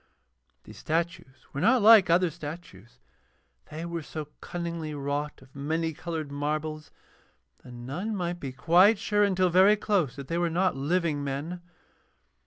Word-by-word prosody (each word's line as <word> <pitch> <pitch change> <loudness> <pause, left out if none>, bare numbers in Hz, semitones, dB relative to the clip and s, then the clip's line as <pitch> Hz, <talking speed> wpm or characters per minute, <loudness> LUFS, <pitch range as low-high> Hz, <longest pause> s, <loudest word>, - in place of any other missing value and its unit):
These - - -13
statues 165 -4 -3
were 140 - -3
not 235 +2 +4
like 215 -4 +8
other 175 0 +3
statues, 145 - -10 0.7
they 160 +2 -6
were 170 -1 -4
so 150 -1 -7
cunningly 170 -3 -5
wrought 145 0 -4
of 130 +1 -22
many 160 +3 -2
coloured 160 -2 -5
marbles 150 +1 -3 0.7
that - - -14
none 140 - -5
might 175 -2 -3
be 135 -4 -5
quite 175 - +4
sure 205 +1 +1
until 185 -3 +2
very 190 +4 +6
close 190 - 0
that 140 -2 -8
they 170 +3 -1
were 175 -1 +1
not 180 +1 +1
living 150 +1 0
men. 145 +6 -4
165 Hz, 150 wpm, -27 LUFS, 145-180 Hz, 0.7 s, like